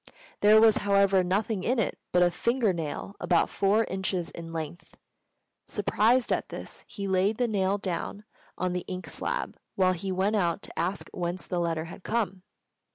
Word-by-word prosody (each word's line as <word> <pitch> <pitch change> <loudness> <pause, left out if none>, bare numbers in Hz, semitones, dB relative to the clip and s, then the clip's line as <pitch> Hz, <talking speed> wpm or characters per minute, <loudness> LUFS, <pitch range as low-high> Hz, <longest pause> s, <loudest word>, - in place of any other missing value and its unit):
There 215 +1 +7
was, 220 -1 +6
however, 200 -2 +3
nothing 195 +2 0
in 250 +6 +1
it 225 - 0
but 180 0 +5
a 175 - +4
finger 235 +2 +1
nail 165 +4 -5
about 175 -2 +2
four 205 +3 +3
inches 190 -3 -2
in 165 -1 -8
length. 165 +1 -6 0.7
Surprised 225 +4 +2
at - - -2
this, - - -7
he 200 -2 -5
laid 190 +3 +2
the 245 - +1
nail 200 -2 +1
down 195 +1 -4 0.3
on 185 -1 -1
the 180 - -2
ink 185 0 -5
slab - - -2 0.2
while 185 -1 +3
he 190 +2 -4
went 190 +3 +1
out 170 -4 0
to - - -7
ask 185 +3 -1
whence 175 +1 -3
the 180 - -2
letter 165 -2 -1
had 170 - -10
come. 205 -3 -1
190 Hz, 175 wpm, -28 LUFS, 180-205 Hz, 0.7 s, There